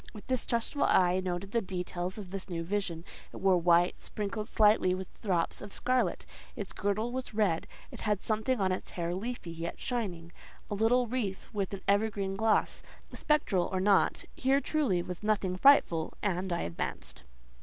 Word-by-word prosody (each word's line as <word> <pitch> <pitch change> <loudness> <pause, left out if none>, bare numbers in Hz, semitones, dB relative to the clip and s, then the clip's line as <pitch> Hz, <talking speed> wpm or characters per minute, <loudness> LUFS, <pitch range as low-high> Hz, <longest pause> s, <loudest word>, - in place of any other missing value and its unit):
With 210 - -10
distrustful 250 +1 0
eye 180 0 +4
I - - +1
noted 185 +1 -3
the 230 - +1
details 180 -1 -4
of 195 -4 -8
this 195 0 -5
new 165 -2 -3
vision. 175 -3 -2 0.3
It - - -9
wore 190 -2 +3
white, 175 +1 +4
sprinkled 210 +1 -4
slightly 210 -4 +4
with 190 0 -9
drops 180 -6 0
of 205 - -8
scarlet; 250 -6 0 0.3
its 200 - -5
girdle 210 +4 -1
was 255 -3 -5
red; 195 -7 +1 0.2
it - - -9
had 210 -2 0
something 220 +4 0
in 190 -1 +2
its 185 - -3
hair 170 -1 -3
leafy, 205 -2 -4
yet 165 +1 -5
shining—a 185 -6 -5
little 230 +4 +3
wreath 220 -5 -3
with 200 -3 -2
an 190 - -10
evergreen 200 -1 +1
gloss. 220 +2 +1 0.3
Spectral 205 - +1
or 190 - 0
not, 195 +1 +3
here 270 +2 +3
truly 275 - 0
was 180 -1 -6
nothing 205 -4 0
frightful, 185 - +4
and 190 -2 -1
I 170 - 0
advanced. 85 0 -5
195 Hz, 170 wpm, -30 LUFS, 180-220 Hz, 0.3 s, eye